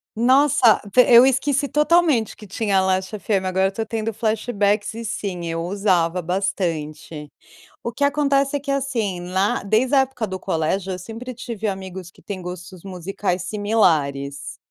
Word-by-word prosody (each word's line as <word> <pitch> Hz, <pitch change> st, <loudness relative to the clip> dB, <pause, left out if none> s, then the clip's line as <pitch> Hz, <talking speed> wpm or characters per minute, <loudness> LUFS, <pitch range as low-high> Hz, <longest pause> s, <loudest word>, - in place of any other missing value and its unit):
Nossa, 255 Hz, -1 st, +4 dB
pe 250 Hz, -, +8 dB
eu 240 Hz, +1 st, +9 dB
esqueci 270 Hz, +1 st, +1 dB
totalmente 300 Hz, -, +2 dB
que 215 Hz, -, -13 dB
tinha 195 Hz, -1 st, 0 dB
Last 190 Hz, +2 st, -1 dB
FM. 195 Hz, 0 st, -1 dB
Agora 190 Hz, +1 st, +2 dB
eu -, -, -3 dB
tô 220 Hz, +3 st, -4 dB
tendo 225 Hz, 0 st, -3 dB
flashbacks 215 Hz, -1 st, 0 dB
e 230 Hz, +1 st, -7 dB
sim, 185 Hz, -5 st, -4 dB
eu 165 Hz, 0 st, -3 dB
usava 180 Hz, -2 st, +1 dB
bastante. 160 Hz, -5 st, -3 dB, 0.5 s
O 235 Hz, -, -3 dB
que 280 Hz, +4 st, 0 dB
acontece 280 Hz, -1 st, +1 dB
é -, -, 0 dB
que, 280 Hz, 0 st, -4 dB
assim, 245 Hz, -9 st, -1 dB
lá, 190 Hz, +3 st, 0 dB
desde 225 Hz, +7 st, +2 dB
a -, -, +6 dB
época 265 Hz, -3 st, -1 dB
do 190 Hz, -2 st, -6 dB
colégio, 185 Hz, +4 st, -1 dB
eu 180 Hz, -, -6 dB
sempre 230 Hz, +7 st, -8 dB
tive 230 Hz, -3 st, -5 dB
amigos 190 Hz, -2 st, -5 dB
que -, -, -22 dB
têm 195 Hz, -2 st, -6 dB
gostos 180 Hz, +1 st, -9 dB
musicais 185 Hz, 0 st, -3 dB
similares. 160 Hz, -10 st, 0 dB
205 Hz, 165 wpm, -21 LUFS, 185-235 Hz, 0.5 s, eu